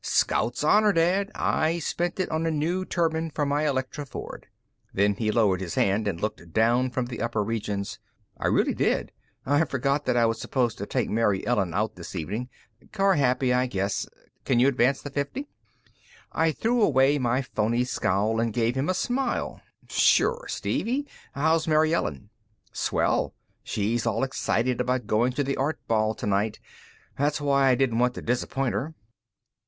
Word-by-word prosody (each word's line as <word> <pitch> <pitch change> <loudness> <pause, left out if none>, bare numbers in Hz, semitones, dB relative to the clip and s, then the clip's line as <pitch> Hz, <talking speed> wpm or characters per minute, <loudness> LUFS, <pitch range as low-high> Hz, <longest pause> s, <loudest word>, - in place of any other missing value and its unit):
"Scout's 120 +5 +1
Honor, 210 +6 +4
Dad, 185 +4 +2
I 160 +2 +1
spent 175 +2 -2
it 185 - +1
on 160 +1 0
a - - +2
new 165 +5 -1
turbine 165 -2 0
for 150 -1 -1
my 145 +2 0
ElectroFord." 135 0 -4 0.5
Then 100 +1 +2
he 110 +2 -2
lowered 100 -5 +2
his 85 -3 -4
hand 100 +2 +1
and 90 -5 -2
looked 85 -5 -4
down 120 +3 +3
from 125 0 -2
the 120 -1 -6
upper 115 -3 0
regions. 105 -2 -3 0.4
"I - - -2
really - - +2
did. - - 0 0.3
I 145 +4 +3
forgot 140 +1 -1
that 120 - +2
I 120 - +4
was 115 0 -1
supposed 125 -4 -1
to 100 - -4
take - - -1
Mary 105 -3 +1
Ellen 95 -8 0
out 105 -1 -1
this 85 +2 -9
evening. 105 +9 -4 0.4
Car 195 -1 +3
happy, 130 -3 +2
I 125 +1 +2
guess. 100 -3 -2 0.4
Can 130 - +1
you 125 +3 +5
advance 135 0 +2
the 145 - -6
fifty?" 145 - -3 0.9
I 165 0 +2
threw 235 +8 0
away 140 -5 +4
my 125 +1 +1
phony 115 0 0
scowl 110 -2 0
and 115 0 0
gave 115 +1 +1
him 135 +5 -1
a 185 - +1
smile. 250 +5 -2 0.3
"Sure, - - +3
Stevie. 270 +5 -1 0.3
How's 160 +3 +1
Mary 155 +1 +3
Ellen?" 80 - -2 0.4
"Swell. - - 0 0.3
She's 115 +3 -1
all 115 +1 0
excited 125 -2 0
about 125 0 -1
going 120 +4 +1
to 145 - 0
the 140 0 -2
Art 145 +4 -1
Ball 110 -1 +1
tonight 105 +2 -1 0.6
that's 145 +1 +1
why 140 -2 +3
I 130 - +5
didn't 120 -3 +1
want 125 0 +2
to - - -7
disappoint 125 +2 -1
her." 155 +4 -3
125 Hz, 170 wpm, -26 LUFS, 110-155 Hz, 0.9 s, you